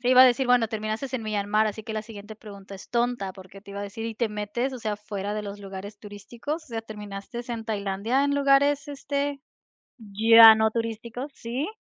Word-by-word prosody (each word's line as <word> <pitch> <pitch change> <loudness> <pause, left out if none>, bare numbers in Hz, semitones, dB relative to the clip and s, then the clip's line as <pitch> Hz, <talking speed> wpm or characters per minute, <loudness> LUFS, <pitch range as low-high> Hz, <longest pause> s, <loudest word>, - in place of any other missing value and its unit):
Te 245 - -1
iba 255 0 +9
a - - +10
decir, 255 +1 +3
bueno, 245 -2 +4
terminaste 220 +4 -3
en 230 - -6
Myanmar, 215 0 +1
así 215 +1 -4
que 220 - -6
la 215 0 -3
siguiente 215 -1 -10
pregunta 200 -3 -11
es 190 - -13
tonta 235 -5 -1
porque 190 +1 -13
te 200 - -14
iba 200 - -5
a - - -3
decir, 205 +3 -6
¿y 225 - -5
te 230 +1 0
metes 210 +5 -3
o 255 - -6
sea 215 -3 -3
fuera 205 0 -5
de 215 - -3
los 205 0 -7
lugares 200 +1 -8
turísticos? 230 +10 -7
O - - -22
sea, 230 -4 -5
¿terminaste 210 +3 -8
en 230 -2 -4
Tailandia 210 +4 -1
en 285 0 +1
lugares 280 +1 +3
este, 280 0 -3 0.6
ya 225 +2 +8
no 220 0 +2
turísticos? 230 +4 -4
¿Sí? 245 +6 -3
220 Hz, 215 wpm, -26 LUFS, 205-245 Hz, 0.6 s, a